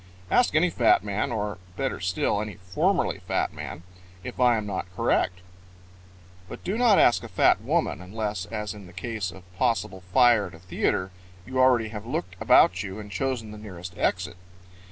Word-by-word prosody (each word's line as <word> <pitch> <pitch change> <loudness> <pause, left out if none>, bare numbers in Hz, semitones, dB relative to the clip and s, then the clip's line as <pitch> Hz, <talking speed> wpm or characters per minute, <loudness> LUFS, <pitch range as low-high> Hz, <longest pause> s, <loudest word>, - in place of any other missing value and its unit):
Ask 245 -11 +3
any 170 +2 +4
fat 120 -8 +4
man 105 +2 -2
or 105 -3 -3 0.2
better 135 -5 -2
still, 95 +2 0
any 105 -1 -5
formerly 90 -2 0
fat - - 0
man 85 - -7 0.4
if - - -7
I 120 -2 +5
am 105 - -3
not 95 -3 -3
correct. 90 +1 +1 1.1
But - - -9
do 195 - -2
not 230 -4 +5
ask 120 - +5
a - - -6
fat - - +3
woman - - 0
unless, 105 0 -4
as 105 -2 -4
in 100 -3 -11
the 85 - -15
case 95 0 -4
of 95 +1 -13 0.2
possible 115 -6 0
fire 120 -3 +5
at 90 - -12
a - - -14
theater, 90 +1 -1 0.3
you 130 +3 -3
already 125 -4 +4
have 105 +1 -7
looked 90 -7 -3
about 95 0 +5
you 100 0 -6
and 105 -1 -9
chosen 115 +1 -2
the 105 - -9
nearest 90 -4 -9
exit. 90 -1 -1
105 Hz, 180 wpm, -26 LUFS, 95-120 Hz, 1.1 s, I